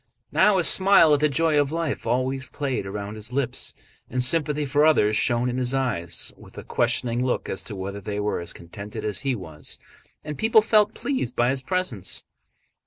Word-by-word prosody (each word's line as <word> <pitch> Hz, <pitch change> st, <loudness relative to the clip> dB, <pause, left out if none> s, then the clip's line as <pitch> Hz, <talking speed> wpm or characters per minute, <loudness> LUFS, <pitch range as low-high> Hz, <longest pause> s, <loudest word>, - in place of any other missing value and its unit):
Now 210 Hz, -2 st, +4 dB
a 180 Hz, -, +2 dB
smile 185 Hz, -4 st, +6 dB
at 145 Hz, -, +3 dB
the 150 Hz, +1 st, +3 dB
joy 155 Hz, +1 st, +2 dB
of 140 Hz, 0 st, -2 dB
life 165 Hz, -6 st, -3 dB
always 130 Hz, +2 st, -1 dB
played 130 Hz, -7 st, -3 dB
round 100 Hz, +1 st, -5 dB
his 110 Hz, +2 st, -6 dB
lips, 130 Hz, -1 st, -2 dB, 0.3 s
and 125 Hz, +1 st, 0 dB
sympathy 150 Hz, +1 st, +1 dB
for 145 Hz, +2 st, +2 dB
others 110 Hz, -9 st, +4 dB
shone 120 Hz, +2 st, +2 dB
in 125 Hz, +1 st, -2 dB
his 125 Hz, +1 st, +1 dB
eyes 90 Hz, -11 st, -1 dB
with -, -, -17 dB
a -, -, -7 dB
questioning 120 Hz, 0 st, 0 dB
look 125 Hz, -, -1 dB
as 95 Hz, -, -4 dB
to 105 Hz, -, -7 dB
whether 100 Hz, +1 st, -5 dB
they 105 Hz, +1 st, -4 dB
were 105 Hz, 0 st, -1 dB
as 85 Hz, 0 st, -5 dB
contented 105 Hz, +5 st, -8 dB
as 105 Hz, -2 st, 0 dB
he 135 Hz, -2 st, -1 dB
was, 80 Hz, -7 st, -6 dB, 0.5 s
and 150 Hz, -2 st, -6 dB
people 220 Hz, -1 st, +5 dB
felt 215 Hz, -1 st, +3 dB
pleased 195 Hz, -, -2 dB
by 120 Hz, +1 st, +2 dB
his 135 Hz, -1 st, -3 dB
presence. 160 Hz, -, -2 dB
130 Hz, 195 wpm, -24 LUFS, 105-150 Hz, 0.5 s, smile